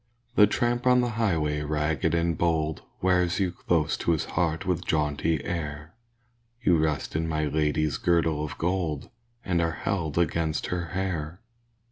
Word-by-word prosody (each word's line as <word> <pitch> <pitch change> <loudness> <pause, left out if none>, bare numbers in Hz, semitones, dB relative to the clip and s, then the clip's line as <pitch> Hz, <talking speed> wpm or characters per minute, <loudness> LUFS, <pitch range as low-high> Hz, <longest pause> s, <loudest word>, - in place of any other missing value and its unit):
The 105 -4 +7
tramp 120 +4 0
on 125 0 +6
the 120 - 0
highway 85 -10 0
ragged 75 +1 0
and 85 0 +1
bold 80 -3 0 0.2
Wears 90 -1 +2
you 95 -3 +1
close 85 -3 0
to 85 - +1
his 80 - -1
heart 80 -2 0
with 90 -1 0
jaunty 75 +1 0
air; 75 -2 -4 0.7
You 90 -9 +3
rest 80 -1 -1
in 80 +1 0
my 80 -1 0
lady's 75 0 0
girdle 80 -3 +2
of 75 - -5
gold, 85 -4 -2 0.3
And 90 -2 +1
are 85 -1 0
held 80 -6 -2
against 80 -2 0
her 90 -1 -2
hair. 90 -3 -2
80 Hz, 155 wpm, -27 LUFS, 75-90 Hz, 0.7 s, The